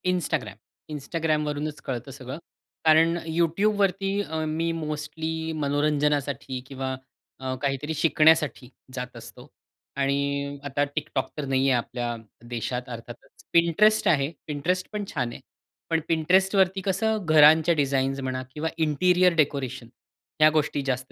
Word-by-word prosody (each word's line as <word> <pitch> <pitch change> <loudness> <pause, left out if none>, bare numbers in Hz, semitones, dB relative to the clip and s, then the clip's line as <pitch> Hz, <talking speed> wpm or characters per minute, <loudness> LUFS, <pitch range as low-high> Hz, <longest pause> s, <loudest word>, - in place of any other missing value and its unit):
Instagram. 155 - -1 0.4
Instagramवरूनच 150 0 -2
कळतं 130 +1 -4
सगळं. 130 +1 -7 0.5
कारण 160 +2 +5 0.2
YouTubeवरती 195 +3 +1
अ, 160 -4 -3
मी 165 +2 -1
मोस्टली 160 +1 -4
मनोरंजनासाठी 145 -2 0
किंवा 130 -1 -4 0.4
अ, 130 -1 -3
काहीतरी 140 +2 -1
शिकण्यासाठी 155 -4 +3 0.2
जात 125 -1 -6
असतो - - -12 0.5
आणि 140 +1 -1
आता 145 0 0
TikTok 150 -3 -2
तर 150 - -3
नाहीये 135 0 +2
आपल्या 120 0 -2 0.3
देशात 125 +2 -3
अर्थातच. 120 0 -11
Pinterest 205 +6 +4
आहे. 145 -2 +2 0.2
Pinterest 180 +6 -1
पण 210 -1 -2
छान 125 -4 -1
आहे. - - -9 0.5
पण 165 -1 +2
Pintrestवरती 190 +3 +3
कसं 210 +2 0
घरांच्या 155 +1 +6
डिझाईन्स 135 -2 0
म्हणा 130 -1 -3
किंवा 160 +2 -2
इंटिरियर 180 +3 +3
डेकोरेशन 140 -6 0 0.5
ह्या 155 0 +7
गोष्टी 150 -2 0
जास्त. 130 -1 -2
150 Hz, 120 wpm, -25 LUFS, 135-165 Hz, 0.5 s, ह्या